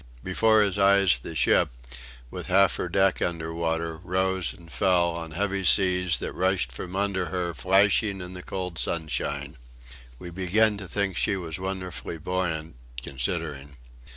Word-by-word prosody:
Before 110 +3 +3
his 100 -1 +1
eyes 100 -7 +4
the - - -8
ship, - - +3 0.6
with - - -6
half 95 +1 +4
her 90 - -3
deck 95 +1 +2
below 80 -1 -2
water, 80 -1 -2
rose 95 0 -1
and 85 -3 -15
fell 85 +4 +2
on 85 -1 -6
heavy 100 +3 -2
seas 90 -2 +3
that - - -5
rushed 95 -8 0
from 90 +9 -7
under 95 -2 0
her 90 -2 -2
flashing 100 +3 +3
in 90 0 -8
the 90 - -8
cold 90 -3 -5
sunshine. 70 -1 -3 0.6
We 85 +7 -9
began 100 +5 +3
to 100 -2 -7
think 95 0 -1
she - - +1
was 85 -2 -5
wonderfully 95 -3 -5
buoyant 80 -4 -3 0.3
considering. 70 +1 -4
90 Hz, 155 wpm, -26 LUFS, 80-95 Hz, 0.6 s, eyes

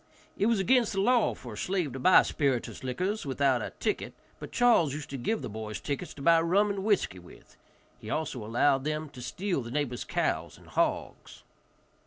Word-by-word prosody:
It 205 - +1
was 230 -3 +2
against 240 +3 +3
the 195 - -1
law 240 +3 +3
for 120 -3 -9
a - - -9
slave 180 - -1
to 135 - -5
buy 185 +8 +7
spirituous 135 -6 -1
liquors 185 - -2
without 135 -2 +1
a - - -4
ticket, - - -2 0.2
but - - -8
Charles 200 - +3
used 150 -2 -7
to - - -4
give 215 - -2
the - - -3
boys 110 -1 -6
tickets 145 +4 -4
to 140 - -9
buy 165 +1 +5
rum 200 +5 +2
and 195 -1 -4
whiskey 195 - +1
with. 90 - -17 0.4
He - - -9
also 135 -7 -3
allowed 130 +5 +2
them 155 +1 -3
to 130 -3 -11
steal 175 +6 -2
the 115 - -7
neighbor's 125 -2 -2
cows - - -2
and - - -17
hogs. - - -2
150 Hz, 200 wpm, -29 LUFS, 125-195 Hz, 0.4 s, buy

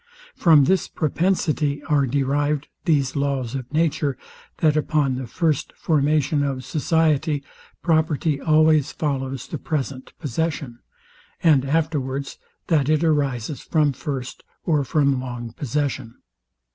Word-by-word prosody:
From 155 -5 +6
this 190 +7 +2
propensity 155 -3 0
are 145 -2 +2
derived 145 +2 0 0.2
these 140 -6 +1
laws 140 -4 -1
of 130 -2 -5
nature, 150 -3 0 0.4
that 155 -2 +3
upon 150 -3 +1
the 130 -1 -4
first 160 +4 -1
formation 150 -1 +1
of 135 -2 -2
society, 155 -2 +1 0.4
property 155 -3 +1
always 155 -2 +4
follows 135 -4 -3
the - - -5
present 135 -4 -4
possession; 145 -4 -3 0.6
and 150 -6 +5
afterwards, 140 -3 -1 0.3
that 150 -4 +2
it 155 +1 +2
arises 140 -4 0
from 150 -3 +1
first 130 -2 -5 0.2
or 150 -4 +2
from 140 -2 +1
long 120 -2 -6
possession. 135 -3 -3
145 Hz, 120 wpm, -23 LUFS, 135-155 Hz, 0.6 s, From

